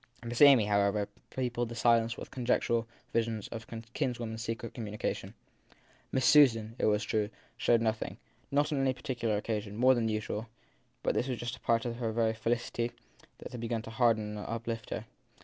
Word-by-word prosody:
Miss 120 +2 -3
Amy, 135 -7 +9
however, 100 0 +2 0.2
peopled 120 -2 -2
the 120 - -6
silence 115 0 +3
with - - -8
conjectural 120 -2 +1 0.3
visions 115 -2 0
of 115 -1 -6
her 115 -1 -6
kinswoman 120 -3 -2
s 110 - -5
secret 115 0 -4
communion. 105 -3 -4 0.8
Miss 130 -2 +1
Susan, 115 -7 +5
it - - +2
was 105 0 +3
true, 105 0 0 0.3
showed 120 -1 +3
nothing, 110 -1 -1 0.3
on 145 +1 +3
any 135 -3 +2
particular 120 -4 -2
occasion, 105 -1 -3
more 130 +2 +6
than 115 -3 +1
usual; 110 +1 -2 0.6
but - - +2
this 125 - 0
was 125 -2 -2
just 120 0 -4
a - - -20
part 115 0 +1
of 120 0 -3
the 115 -2 -1
very 110 0 +2
felicity 115 +1 -1 0.4
that - - -9
had 120 - -6
begun 115 -1 -2
to 115 - -8
harden 110 -3 +2
and - - -6
uplift 115 -1 -4
her. - - -4
115 Hz, 185 wpm, -31 LUFS, 110-120 Hz, 0.8 s, Amy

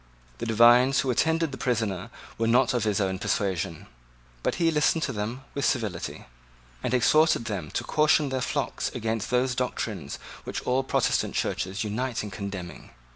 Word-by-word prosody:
The - - -3
divines 120 +4 +6
who 130 - 0
attended 160 +4 +1
the 135 - -8
prisoner 110 -7 -1 0.3
were 115 - +1
not 125 +2 +4
of 120 -3 0
his 105 -1 +1
own 95 -2 -1
persuasion; 90 -7 -1 0.6
but - - 0
he 165 -2 +2
listened 155 +1 +2
to 135 - -1
them 110 +5 -4
with 140 - -3
civility, 110 -11 -2 0.6
and - - -2
exhorted 130 +2 +4
them 95 -9 -4
to - - -2
caution 150 -1 +3
their 130 -1 -2
flocks - - -2
against 110 -1 -2
those 125 +1 +2
doctrines 110 - -3 0.3
which - - -5
all 130 +1 +1
Protestant - - 0
churches 95 +3 -1
unite 115 +3 -2
in 105 - -6
condemning. 100 -4 -7
115 Hz, 165 wpm, -26 LUFS, 100-130 Hz, 0.6 s, divines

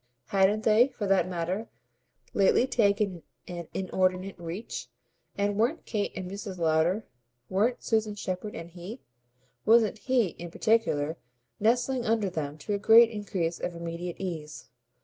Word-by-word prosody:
Hadn't 200 +2 +3
they, 220 +3 +5
for 230 -6 -5
that 190 -2 +2
matter, 180 +5 -2 0.7
lately 200 +5 +4
taken 200 -7 +1 0.3
an 175 -2 -6
inordinate 185 0 0
reach, 175 +6 -6 0.5
and 200 0 0
weren't 240 +9 +1
Kate 205 -3 -1
and 185 -1 -5
Mrs. 195 0 -6
Lowder, 165 +5 +2 0.4
weren't 220 +6 +1
Susan 220 -2 0
Shepherd 200 +1 -4
and 170 +1 -8
he, 185 +8 -8 0.6
wasn't 220 -1 +4
HE 250 -6 +2
in 175 0 -6
particular, 165 -7 +1 0.4
nestling 245 +3 +2
under 220 -4 +1
them 150 -3 -4
to 205 +6 -4
a 200 - 0
great 225 +2 +7
increase 190 -6 -2
of 175 - -3
immediate 170 +1 -5
ease? 160 -6 -6
195 Hz, 140 wpm, -28 LUFS, 175-220 Hz, 0.7 s, great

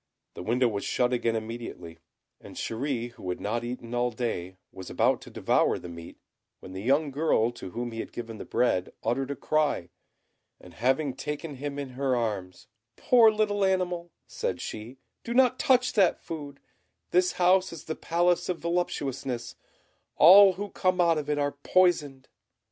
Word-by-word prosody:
The - - -8
window 120 +6 +2
was 100 -3 -3
shut 125 0 0
again 115 -2 0
immediately; 110 -7 -6 0.4
and - - -13
Chéri, 120 0 -3
who 95 - -8
had 90 - -3
not 115 +3 -2
eaten 120 -1 -6
all 120 0 +1
day, 100 -6 -4
was 95 - -9
about - - +1
to - - -11
devour - - +1
the 90 - -9
meat, 85 0 -10 0.4
when 95 - -11
the 95 - -6
young 140 +6 +2
girl 135 -5 +1
to 120 -6 -9
whom 120 +6 -4
he 115 - -7
had - - -5
given 115 -2 -7
the - - -5
bread 95 -7 0
uttered 130 +4 -1
a 140 - -3
cry, 150 - 0 0.7
and 90 - -15
having 130 - 0
taken 150 +2 -5
him 145 +1 -5
in 140 -2 -4
her 130 0 -1
arms, 100 -7 -3 0.3
"Poor 235 -3 +6
little 210 -2 0
animal," 180 -3 0
said - - -3
she, 110 +5 -7 0.3
"do 235 - -4
not 255 -1 +4
touch 255 -4 +3
that 195 -5 +3
food; 145 -4 -8 0.5
this 180 +1 +3
house 185 +1 +3
is 165 -2 -9
the 160 - -4
Palace 175 +1 +1
of 180 - -1
Voluptuousness; 135 -8 -3 0.6
all 190 +4 +8
who 200 +2 -6
come 185 -1 0
out 170 -3 +4
of 150 0 -6
it 150 - +1
are 145 0 0
poisoned." 145 -4 +1
135 Hz, 175 wpm, -27 LUFS, 115-175 Hz, 0.7 s, all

